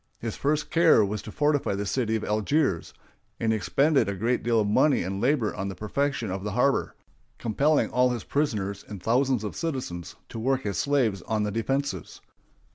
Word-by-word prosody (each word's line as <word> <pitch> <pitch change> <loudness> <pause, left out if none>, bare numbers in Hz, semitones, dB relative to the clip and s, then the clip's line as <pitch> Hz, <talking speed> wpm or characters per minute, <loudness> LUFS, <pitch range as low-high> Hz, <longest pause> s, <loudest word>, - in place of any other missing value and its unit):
His 115 -2 -5
first 150 +1 -1
care 165 -10 +5
was 105 +1 -3
to 110 - -9
fortify 145 -6 +1
the 100 +1 -3
city 110 +1 0
of 110 - -2
Algiers, 105 - 0 0.5
and 110 - +1
he - - +2
expended 110 - +2
a 100 - -2
great 115 +6 0
deal 115 -1 +2
of 105 - +1
money 135 +5 +3
and 95 +2 -3
labor 125 -4 +1
on 95 -1 -3
the 95 - -5
perfection 120 +1 -2
of 95 0 -4
the 105 -2 -3
harbor, 130 +4 +1 0.4
compelling 140 +7 +1
all 125 0 +3
his 120 -4 -3
prisoners 105 -9 -1
and 105 -2 -7
thousands 125 0 +2
of 105 - -5
citizens 130 - -4
to 115 - -6
work 130 +2 0
as 100 -3 -1
slaves 125 -10 +1
on 110 -1 0
the 105 - -1
defenses. 115 - -2
115 Hz, 195 wpm, -26 LUFS, 100-140 Hz, 0.5 s, care